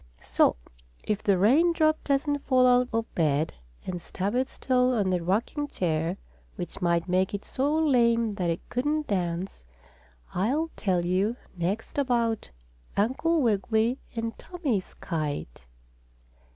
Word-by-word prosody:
So - - +3 0.5
if 210 -1 -1
the 200 -2 +3
rain 285 - +4
drop 310 -1 +2
doesn't 285 +1 +1
fall 255 -2 +3
out 250 0 +4
of 225 0 -2
bed, 155 -1 +1 0.3
and 180 -2 -4
stub 195 +4 -3
its 255 +2 -1
toe 255 -1 +2
on 200 -4 +1
the 180 -1 +1
rocking 230 - 0
chair, 170 - -1 0.4
which 180 -3 -6
might 170 0 +1
make 185 +2 +1
it 200 - -6
so 275 +3 0
lame 235 -7 +3
that 180 -4 -1
it 165 - -3
couldn't 295 +5 -1
dance, 180 - -2 0.7
I'll 280 - 0
tell 180 -4 0
you 195 +6 +1 0.2
next 190 +10 -2
about 235 -5 0 0.5
Uncle 270 +9 +2
Wiggily 225 +3 +1 0.2
and 230 0 -3
Tommie's 285 - -3
kite. 145 - -4
220 Hz, 140 wpm, -27 LUFS, 180-260 Hz, 0.7 s, rain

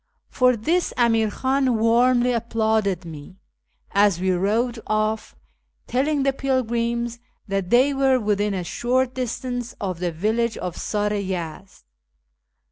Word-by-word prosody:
For 250 -1 +3
this 330 +11 0
Amir 225 -3 +3
Khan 260 +1 +1
warmly 240 +2 +3
applauded 220 -5 0
me, 160 +3 -10 0.5
as 200 -3 +3
we 185 +1 +1
rode 220 +6 0
off, 215 0 -1 0.5
telling 280 +3 0
the 275 0 +2
pilgrims 235 -3 -1 0.3
that 195 -2 -2
they 255 +5 +4
were 270 -1 +3
within 205 -2 0
a 185 - -2
short 250 +7 0
distance 245 -1 -4
of 185 -5 -3
the 175 -1 -1
village 220 +7 0
of 180 -2 -5
Sar 210 0 -1
i 205 - -1
Yezd. 185 0 -6
225 Hz, 130 wpm, -23 LUFS, 200-250 Hz, 0.5 s, they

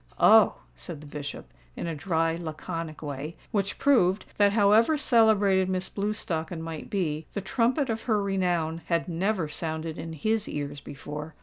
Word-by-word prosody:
"Oh!" - - +7 0.2
said 100 - -7
the 150 - -12
Bishop, 145 -1 -7 0.2
in - - -4
a 165 - -2
dry 165 +1 0
laconic 160 -1 -5
way, 145 +3 -5 0.2
which 200 -3 -1
proved 210 -9 +3
that, 205 -1 +5
however 220 +8 +5
celebrated 210 -8 +4
Miss 185 0 -1
Blewstocken 185 -5 -2
might 165 -1 -6
be, 160 -6 -2
the - - -2
trumpet 250 +6 +1
of 225 -2 -2
her 215 -2 +3
renown 175 -5 0
had 170 0 0
never 180 0 0
sounded 160 +1 -4
in 165 0 -6
his 215 +7 -1
ears 145 0 -4
before. 150 +2 -8
175 Hz, 160 wpm, -27 LUFS, 155-205 Hz, 0.2 s, Oh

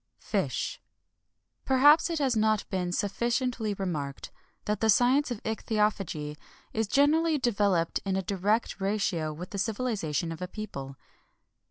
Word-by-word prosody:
FISH. - - -2 0.8
Perhaps 290 +5 +5
it 335 - -1
has 270 -5 +1
not 215 -1 +2
been 180 -2 -1
sufficiently 230 +2 -1
remarked 150 -8 -4 0.3
that 210 0 -1
the 220 - +1
science 255 +7 +4
of 240 -4 -5
ichthyophagy 205 -9 -1 0.4
is 220 -1 0
generally 305 +6 +3
developed 200 - +1
in 195 -1 -1
a 190 - -1
direct 200 +3 0
ratio 195 -6 0
with 170 +4 -8
the 200 - -4
civilization 195 - -1
of 165 - -7
a 180 - -3
people. 160 -10 -7
210 Hz, 135 wpm, -28 LUFS, 180-240 Hz, 0.8 s, Perhaps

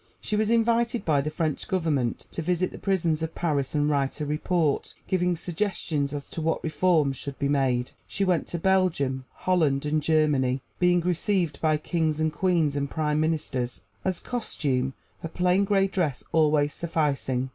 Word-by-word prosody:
She 215 - -2
was 215 0 +1
invited 235 0 +2
by 145 -3 +3
the 150 - -2
French 155 -1 -2
Government 155 -10 0
to - - -4
visit 180 +2 0
the - - -9
prisons 170 -5 0
of 160 0 -4
Paris 145 -5 -1
and 145 0 +2
write 140 -1 0
a 150 - -2
report, 150 0 0
giving 180 -1 +1
suggestions 165 -5 -2
as 145 -1 -5
to 165 - -4
what 160 +1 0
reforms 155 -4 +2
should 140 +1 -6
be 140 - 0
made. 130 -3 +1 0.2
She 195 - -1
went 180 -4 +1
to 175 - -3
Belgium, 165 -8 +1
Holland 155 -7 +1
and 155 +1 +1
Germany, 145 -4 +2 0.2
being 180 -1 +4
received 175 -2 0
by 155 -1 +3
kings 155 -1 -1
and 155 -1 +1
queens 165 -4 +1
and 140 -1 -1
prime 150 0 0
ministers 150 -6 -1 0.2
as 185 -2 -1
costume, 135 - -2 0.3
her 165 - -5
plain 180 +3 +2
gray 195 -1 +3
dress 175 -9 -1
always 150 -2 +3
sufficing. 140 -6 -1
155 Hz, 170 wpm, -26 LUFS, 145-180 Hz, 0.3 s, being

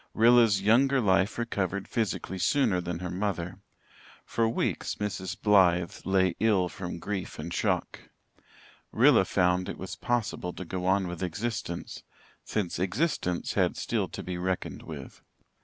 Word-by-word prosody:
Rilla's 115 -4 +5
younger 130 +6 +4
life 95 -2 +2
recovered 100 -5 -2
physically 100 -4 -2
sooner 110 -3 +2
than 85 -1 -4
her 90 0 -5
mother. 90 -2 -3 0.7
For 115 -1 +1
weeks - - -1
Mrs. 95 -3 -4
Blythe 90 -4 +4
lay 95 -2 +3
ill 100 -5 +3
from 90 -1 -6
grief 95 +2 -4
and - - -5
shock. - - -2 0.8
Rilla - - +5
found 90 0 +1
it - - -5
was 95 - -6
possible 115 -7 -2
to 95 - -7
go 90 +1 -3
on 95 0 +2
with 90 -1 -6
existence, 105 -2 -4 0.4
since 100 -6 -2
existence 95 - -1
had - - +1
still - - -1
to - - -7
be 90 -1 -4
reckoned 95 0 -3
with. - - -9
95 Hz, 140 wpm, -28 LUFS, 90-110 Hz, 0.8 s, Rilla's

